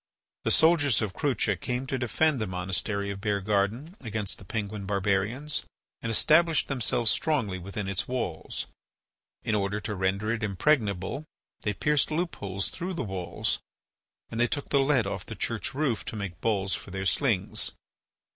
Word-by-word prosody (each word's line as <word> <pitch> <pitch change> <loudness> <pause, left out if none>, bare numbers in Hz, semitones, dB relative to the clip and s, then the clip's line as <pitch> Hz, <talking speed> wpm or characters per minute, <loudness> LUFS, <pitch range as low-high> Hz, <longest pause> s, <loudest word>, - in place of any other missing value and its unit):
The - - +3
soldiers 155 -8 +5
of 100 -3 -2
Crucha 125 -8 +1
came 125 +8 -2
to 130 -1 -2
defend 135 +3 +2
the 110 - 0
monastery 95 +2 -1
of 100 -1 -6
Beargarden 105 - 0
against 110 -4 -2
the 95 - -12
Penguin 105 -2 -3
barbarians 105 +9 +1 0.4
and 115 - -2
established 160 +7 +4
themselves 120 -3 +1
strongly 115 -12 +1
within 100 +2 -4
its 95 -2 -1
walls. 95 -11 -2 0.8
In 110 - 0
order 100 0 +1
to 105 +1 -3
render 100 +3 0
it 115 - -3
impregnable 105 - +1 0.4
they 105 - 0
pierced 150 +5 +2
loop 170 +3 -1
holes 95 -1 -2
through 185 +1 -4
the 165 - -1
walls 95 -5 -1 0.7
and 115 - -3
they 120 - +4
took 145 +3 -2
the 140 - +4
lead 135 -4 +3
off 100 - -3
the - - -5
church - - -1
roof 140 -6 +1
to - - -5
make 100 -5 -5
balls 100 -4 +1
for - - -3
their 95 +1 -3
slings. 110 -3 +1
105 Hz, 165 wpm, -28 LUFS, 100-135 Hz, 0.8 s, soldiers